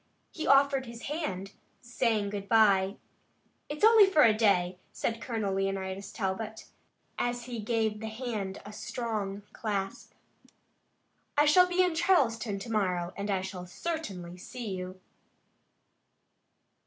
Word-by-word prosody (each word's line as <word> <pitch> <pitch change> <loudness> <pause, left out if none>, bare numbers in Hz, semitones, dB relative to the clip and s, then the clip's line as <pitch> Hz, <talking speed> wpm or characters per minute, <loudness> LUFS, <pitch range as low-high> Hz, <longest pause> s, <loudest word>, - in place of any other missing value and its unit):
He 315 - -4
offered 275 -1 +4
his 235 0 -9
hand, 200 - -3 0.3
saying 225 -4 0
good 200 -1 -5
bye. 200 -3 +4 0.7
"It's 300 +4 -6
only 440 -2 +8
for 340 -6 +5
a 225 - +6
day," 185 -5 +2
said 230 0 -3
Colonel 220 -5 -2
Leonidas 195 0 -2
Talbot, 215 +2 -4 0.5
as 245 0 -1
he 240 -1 -6
gave 220 -1 0
the 220 - -5
hand 220 -4 -4
a 205 - -9
strong 210 -3 -4
clasp. 200 -3 -4 1.2
"I 295 - +6
shall 360 +5 +6
be 360 +1 +3
in 360 -2 +1
Charleston 230 - +2
tomorrow, 195 -5 -1
and 200 +1 -4
I 195 -2 +1
shall 185 -1 -6
certainly 185 - -5
see 225 +4 -7
you." 185 0 -7
215 Hz, 130 wpm, -30 LUFS, 195-245 Hz, 1.2 s, only